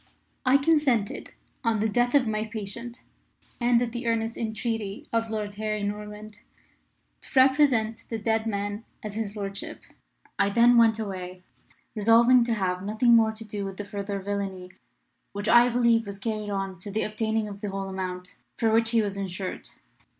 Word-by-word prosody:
I 260 +2 +7
consented, 280 -8 +1 0.3
on 230 -2 +1
the 220 - +2
death 245 +5 +1
of 275 -3 +5
my 215 -1 -1
patient, 225 +3 -6 0.6
and 240 -1 +3
at 235 - -3
the 240 0 -4
earnest 230 0 0
entreaty 220 -2 -3
of 230 0 0
Lord 210 -2 -3
Harry 215 -1 -2
Norland, 210 +1 -6 0.8
to - - -11
represent 260 -5 +3
the 225 - -2
dead 220 +1 0
man 205 0 -3 0.2
as 210 -1 -5
his 215 -1 -4
lordship. 200 -1 -5 0.6
I 200 0 +4
then 235 +3 +5
went 225 -2 +5
away, 185 -4 -6 0.5
resolving 230 +3 +5
to 235 -1 0
have 180 -3 -1
nothing 220 +4 +3
more 220 -1 +4
to 220 +1 -10
do 205 -1 -5
with 195 -1 -6
the 205 - -5
further 200 0 -4
villainy 195 -2 -4 0.6
which 205 0 -4
I 240 +1 +6
believe 235 -2 +2
was 200 0 -6
carried 215 0 -3
on 195 -2 -3
to 190 - -8
the 215 +2 -1
obtaining 220 0 -1
of 200 -1 -9
the 210 - -3
whole 195 0 -4
amount 185 -1 -5 0.2
for 225 -1 +2
which 225 0 +4
he 230 -2 +3
was 200 -1 -3
insured. 190 -1 -5
215 Hz, 170 wpm, -26 LUFS, 200-230 Hz, 0.8 s, I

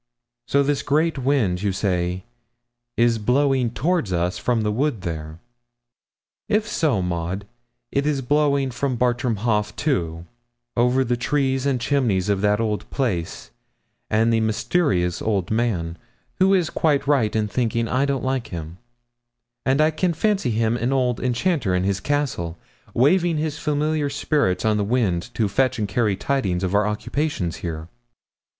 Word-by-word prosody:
So 140 +3 +3
this 145 0 0
great 155 +1 +1
wind, 125 -10 +1
you 100 -1 +1
say, 90 -2 -1 0.7
is 115 -1 +3
blowing 130 +2 +2
toward 150 - 0
us 90 0 0
from 120 -3 0
the 105 - 0
wood 125 -1 -1
there. 80 -3 -5 1.1
If 215 +1 +2
so, 145 - +1
Maud, 90 +3 -3 0.5
it 140 +1 0
is 140 -3 0
blowing 140 0 +2
from 130 +2 -1
Bartram 120 -1 +1
Haugh, 105 -2 +1
too, 85 - -1 0.5
over 125 +2 +3
the 120 -1 0
trees 135 +1 0
and 135 -3 +1
chimneys 115 -7 +1
of 100 -1 +1
that 105 +1 +2
old 110 -2 -2
place, 90 - -3 0.6
and 115 +2 +3
the 115 - +3
mysterious 110 - 0
old 100 -5 -1
man, 100 -8 -1 0.4
who 190 +1 +5
is 175 -4 +1
quite 145 -3 +1
right 135 -8 +2
in 110 -1 +1
thinking 115 0 0
I 130 +4 +1
don't 140 -2 -1
like 130 -2 -1
him; 85 0 -7 0.9
and 135 +2 +3
I 155 +1 +4
can 170 +2 0
fancy 200 - +1
him 115 +1 +1
an 120 +2 -1
old 125 -3 +1
enchanter 125 - 0
in 90 - +1
his 100 0 0
castle, 125 - -2 0.4
waving 165 +6 +3
his 150 -1 -2
familiar 150 0 0
spirits 140 -9 0
on 110 -1 +3
the 105 - +1
wind 105 -3 0
to 110 - +1
fetch 130 +6 +1
and 105 -2 -1
carry 105 -1 +1
tidings 95 -6 -1
of 95 0 -1
our 105 +1 +3
occupations 105 - -2
here.' 80 -2 -5
120 Hz, 155 wpm, -22 LUFS, 100-140 Hz, 1.1 s, who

